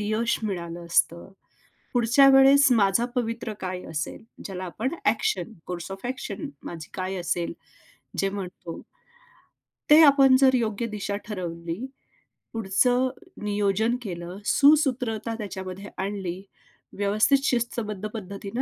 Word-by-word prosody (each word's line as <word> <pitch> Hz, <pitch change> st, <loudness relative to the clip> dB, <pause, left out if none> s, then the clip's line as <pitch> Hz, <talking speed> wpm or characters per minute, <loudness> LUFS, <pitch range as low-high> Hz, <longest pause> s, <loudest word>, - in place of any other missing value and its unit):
यश 215 Hz, +3 st, 0 dB
मिळालं 175 Hz, -4 st, -4 dB
असतं? 170 Hz, +2 st, +1 dB, 0.6 s
पुढच्या 245 Hz, +3 st, +5 dB
वेळेस 270 Hz, +1 st, +7 dB
माझा 205 Hz, 0 st, +3 dB
पवित्रा 230 Hz, -2 st, -2 dB
काय 185 Hz, -1 st, -4 dB
असेल? 150 Hz, -1 st, -4 dB, 0.2 s
ज्याला 185 Hz, -1 st, -5 dB
आपण 225 Hz, -, -3 dB
ॲक्शन 210 Hz, -2 st, 0 dB
कोर्स 175 Hz, 0 st, -6 dB
ऑफ 195 Hz, +3 st, -9 dB
ॲक्शन 265 Hz, +3 st, -5 dB, 0.2 s
माझी 165 Hz, -3 st, -8 dB
काय 190 Hz, 0 st, -3 dB
असेल 175 Hz, -1 st, -2 dB, 0.7 s
जे 195 Hz, -, +2 dB
म्हणतो? 180 Hz, -3 st, -7 dB, 1.1 s
ते 300 Hz, +1 st, +9 dB
आपण 275 Hz, -3 st, +7 dB
जर 260 Hz, -1 st, +5 dB
योग्य 230 Hz, -2 st, -1 dB
दिशा 205 Hz, -2 st, -4 dB
ठरवली, 175 Hz, 0 st, -5 dB, 0.7 s
पुढचं 245 Hz, +5 st, +2 dB, 0.3 s
नियोजन 210 Hz, +2 st, +1 dB
केलं, 175 Hz, -4 st, -6 dB
सुसूत्रता 260 Hz, -7 st, +3 dB
त्याच्यामध्ये 195 Hz, -2 st, -6 dB
आणली, 190 Hz, -2 st, -4 dB, 0.6 s
व्यवस्थित 210 Hz, +7 st, +3 dB
शिस्तबद्ध 225 Hz, -5 st, -1 dB
पद्धतीनं 200 Hz, +2 st, -5 dB
210 Hz, 115 wpm, -25 LUFS, 185-240 Hz, 1.1 s, ते